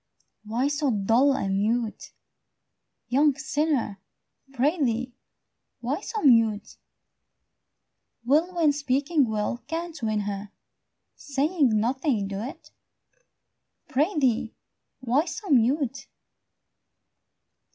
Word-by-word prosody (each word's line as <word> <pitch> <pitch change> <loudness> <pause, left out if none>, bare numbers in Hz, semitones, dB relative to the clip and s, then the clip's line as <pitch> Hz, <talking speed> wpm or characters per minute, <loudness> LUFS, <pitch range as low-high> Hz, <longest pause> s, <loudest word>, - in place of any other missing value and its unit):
Why 235 +5 0
so 290 0 0
dull 230 +6 +3
and 195 0 -1
mute, 225 +1 -1 1.0
young 285 +2 +3
sinner? 295 -8 -1 0.5
Prithee, 260 -3 0 0.7
why 265 - -2
so 435 0 -4
mute? 225 -6 +3 1.5
Will, 310 +8 +3
when 325 -4 +4
speaking 280 0 +1
well 220 +3 -2
can't 330 -1 -5
win 215 -2 0
her, 200 0 -5 0.6
Saying 280 -5 +1
nothing 245 -2 0
do't? 260 - -7 1.2
Prithee, 270 - +1 0.5
why 260 +5 +1
so 360 +2 -6
mute? 270 +2 +2
265 Hz, 85 wpm, -26 LUFS, 225-300 Hz, 1.5 s, when